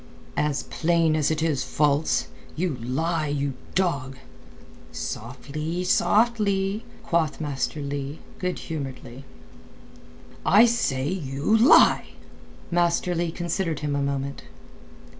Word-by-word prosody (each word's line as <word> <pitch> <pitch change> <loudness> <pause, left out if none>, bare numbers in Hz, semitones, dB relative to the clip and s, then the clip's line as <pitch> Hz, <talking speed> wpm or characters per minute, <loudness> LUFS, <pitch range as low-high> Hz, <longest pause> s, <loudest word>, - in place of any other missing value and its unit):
"As 150 -1 0
plain 165 -1 +1
as 155 -2 +2
it 160 0 0
is 150 -5 +1
false. 145 +2 +1 0.3
You 175 -1 -1
lie, 155 +6 -1
you 140 -1 -1 0.2
dog!" 140 -8 0 0.7
"Softly, 150 +9 -4
softly!" 205 0 +2 0.2
quoth 165 -7 0
Master 145 -1 -2
Leigh, 140 +1 -4 0.2
good 180 0 -2
humouredly. 135 -4 -7 1.2
"I 210 +5 +7
say 140 - 0
you 150 +1 0
lie!" 230 +4 +6 0.6
Master 175 +1 +2
Leigh 170 0 0
considered 170 -1 -2
him 145 -1 -1
a 140 - 0
moment. 140 0 -2
155 Hz, 105 wpm, -25 LUFS, 140-175 Hz, 1.2 s, I